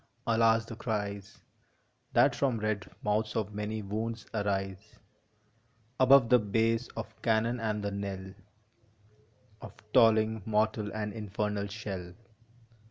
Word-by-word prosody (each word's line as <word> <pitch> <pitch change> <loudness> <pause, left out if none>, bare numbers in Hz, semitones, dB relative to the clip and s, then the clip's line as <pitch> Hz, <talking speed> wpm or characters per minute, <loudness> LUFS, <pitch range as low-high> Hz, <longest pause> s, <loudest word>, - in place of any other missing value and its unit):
Alas 115 0 +3
the 115 - -8
cries 100 -4 -4 0.7
That - - +5
from 130 -4 +1
red 105 -2 -2
mouths 105 +1 0
of 105 -1 -2
many 105 +1 -3
wounds 110 +3 -4
arise 100 -1 -3 1.0
Above 130 -1 +7
the 125 - +6
bass 115 +3 +1
of 110 0 -7
cannon 115 +1 +1
and 105 -2 -2
the 100 - -2
knell 95 -1 -5 1.3
Of - - -9 0.2
tolling 110 -1 +4
mortal 110 0 0
and 105 -1 -4
infernal 105 -1 -2
shell 95 -4 -6
110 Hz, 115 wpm, -30 LUFS, 100-115 Hz, 1.3 s, Above